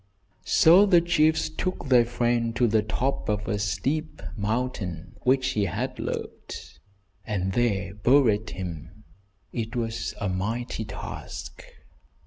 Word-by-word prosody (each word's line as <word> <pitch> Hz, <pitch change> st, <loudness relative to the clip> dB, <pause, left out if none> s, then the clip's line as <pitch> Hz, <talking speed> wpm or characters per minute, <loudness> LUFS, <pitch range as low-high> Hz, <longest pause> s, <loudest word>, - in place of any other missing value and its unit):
So 180 Hz, +6 st, +7 dB
the 180 Hz, -3 st, +6 dB
chiefs 160 Hz, -2 st, +2 dB
took 170 Hz, +3 st, -3 dB
their 125 Hz, -2 st, +6 dB
friend 120 Hz, -1 st, 0 dB
to 125 Hz, -, +3 dB
the 110 Hz, -1 st, +3 dB
top 125 Hz, +5 st, -2 dB
of 105 Hz, 0 st, -1 dB
a 105 Hz, -2 st, -1 dB
steep 135 Hz, -, -2 dB
mountain 100 Hz, -5 st, -3 dB
which 130 Hz, 0 st, +2 dB
he 105 Hz, -6 st, +1 dB
had 90 Hz, -, -3 dB
loved, -, -, -6 dB, 0.4 s
and 95 Hz, -4 st, -2 dB
there 100 Hz, -5 st, 0 dB
buried 110 Hz, -1 st, +3 dB
him. 90 Hz, +2 st, -7 dB, 0.5 s
It 115 Hz, +1 st, -3 dB
was 115 Hz, -1 st, -2 dB
a 100 Hz, -, -1 dB
mighty 110 Hz, +5 st, -2 dB
task. 100 Hz, -1 st, -7 dB
115 Hz, 125 wpm, -26 LUFS, 100-130 Hz, 0.5 s, So